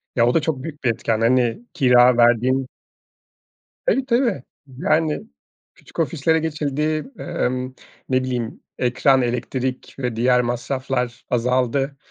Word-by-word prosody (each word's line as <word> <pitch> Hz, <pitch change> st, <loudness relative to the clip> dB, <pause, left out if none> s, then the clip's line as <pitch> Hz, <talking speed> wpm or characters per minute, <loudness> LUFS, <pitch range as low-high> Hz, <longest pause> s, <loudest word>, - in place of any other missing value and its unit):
Ya, 120 Hz, -1 st, +4 dB
o 120 Hz, -, +2 dB
da 165 Hz, -, +3 dB
çok 150 Hz, -4 st, -2 dB
büyük 155 Hz, -2 st, -8 dB
bir 125 Hz, -, +2 dB
etken, 110 Hz, 0 st, -1 dB
hani, 120 Hz, -, +2 dB
kira 125 Hz, -2 st, +5 dB
verdiğin 120 Hz, +3 st, +3 dB, 1.2 s
Tabii, 270 Hz, -, +2 dB
tabii. 235 Hz, -, +1 dB, 0.4 s
Yani, 155 Hz, +1 st, +1 dB, 0.5 s
küçük -, -, -19 dB
ofislere 160 Hz, 0 st, +1 dB
geçildi, 155 Hz, -, -2 dB
emm, 130 Hz, +1 st, -2 dB, 0.3 s
ne 130 Hz, 0 st, +2 dB
bileyim, 120 Hz, -3 st, -3 dB, 0.2 s
ekran, 130 Hz, +2 st, +3 dB
elektrik 125 Hz, +1 st, -3 dB
ve 125 Hz, -4 st, -3 dB
diğer 125 Hz, +2 st, +3 dB
masraflar 125 Hz, 0 st, -2 dB
azaldı. 125 Hz, +3 st, 0 dB
130 Hz, 125 wpm, -21 LUFS, 120-150 Hz, 1.2 s, kira